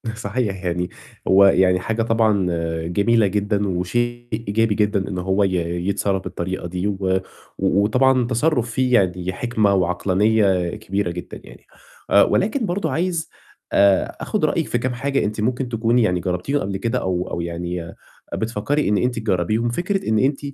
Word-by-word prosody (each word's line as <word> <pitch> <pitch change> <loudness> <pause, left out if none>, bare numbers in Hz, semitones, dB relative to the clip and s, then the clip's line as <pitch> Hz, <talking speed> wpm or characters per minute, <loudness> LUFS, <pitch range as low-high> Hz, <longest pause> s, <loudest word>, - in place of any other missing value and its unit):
صحيح 100 -3 -3
يعني 90 +1 -1 0.4
هو 95 +1 +6
يعني 95 -1 +4
حاجة 110 +5 -2
طبعًا 110 -4 +2 0.4
جميلة 105 +5 +2
جدًا 105 +1 0
وشيء 120 +7 -2
إيجابي 110 0 0
جدًا 105 -2 +1
إن 95 - -4
هو 95 +3 +1
ي 95 -1 +1 0.3
يتصرّف 100 -1 0
بالطريقة 95 0 -4
دي، 90 +3 -3
و 95 -2 0 0.4
وطبعًا 120 +6 +2
تصرُّف 125 -1 0
فيه 125 +1 0
يعني 90 -3 +1
حِكمة 110 -2 +1
وعقلانية 95 0 +1
كبيرة 100 -4 -2
جدًا 90 0 -8
يعني، - - -15 0.4
آآ، - - +6
ولكن 225 +5 +1
برضه 175 -4 -2
عايز 170 +2 -1 0.4
آآ 100 -1 +3
آخُد - - 0
رأيِِك - - 0
في 120 - 0
كام 125 +1 -2
حاجة 135 +2 -1
أنتِ 105 +1 -2
ممكن 125 +3 -1
تكوني 115 +1 +2
يعني 90 -4 +1
جرّبتيهم 90 +11 -1
قبل 95 0 -3
كده 115 +3 -1
أو 90 -1 -2
أو 85 - -2
يعني 85 0 -5 0.4
بتفكّري 115 +6 -1
إن 105 - +2
أنتِ 125 0 0
تجرّبيهم، 110 +2 0
فكرة 180 - -2
إن 110 -1 +2
أنتِ 135 +3 +1
105 Hz, 160 wpm, -21 LUFS, 95-120 Hz, 0.4 s, هو